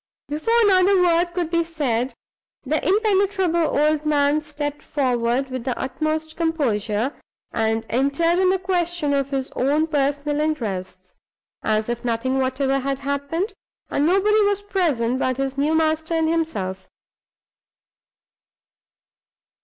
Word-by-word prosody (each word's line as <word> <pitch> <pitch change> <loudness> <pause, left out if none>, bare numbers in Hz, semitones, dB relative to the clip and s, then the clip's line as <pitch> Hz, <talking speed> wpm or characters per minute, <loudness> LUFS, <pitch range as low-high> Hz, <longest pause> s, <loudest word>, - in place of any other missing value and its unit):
Before 455 +11 +1
another 385 -1 +4
word 345 0 +3
could 345 -3 -1
be 335 -1 +2
said, 270 -7 -2 0.5
the 295 +3 -1
impenetrable 385 -6 +2
old 300 +1 +2
man 295 0 +2
stepped 295 -1 -5
forward, 255 -1 0
with 255 -2 -4
the 255 -1 -3
utmost 310 +3 -2
composure, 255 -7 0 0.4
and 225 0 0
entered 280 +8 +1
on 375 -1 +4
the 380 - +3
question 350 -5 -1
of 275 -1 0
his 270 -1 -3
own 290 +5 +1
personal 290 -1 0
interests, 195 -11 -3 0.5
as 215 0 0
if 240 +1 -3
nothing 245 +3 0
whatever 265 +1 0
had 275 0 -2
happened, 280 - -2 0.4
and 290 +2 +2
nobody 410 +4 +3
was 405 -1 +1
present 285 - 0
but 255 -1 0
his 270 0 -2
new 295 +3 +1
master 320 +1 +1
and 320 -1 +2
himself. 205 - -2
295 Hz, 130 wpm, -22 LUFS, 260-335 Hz, 0.5 s, another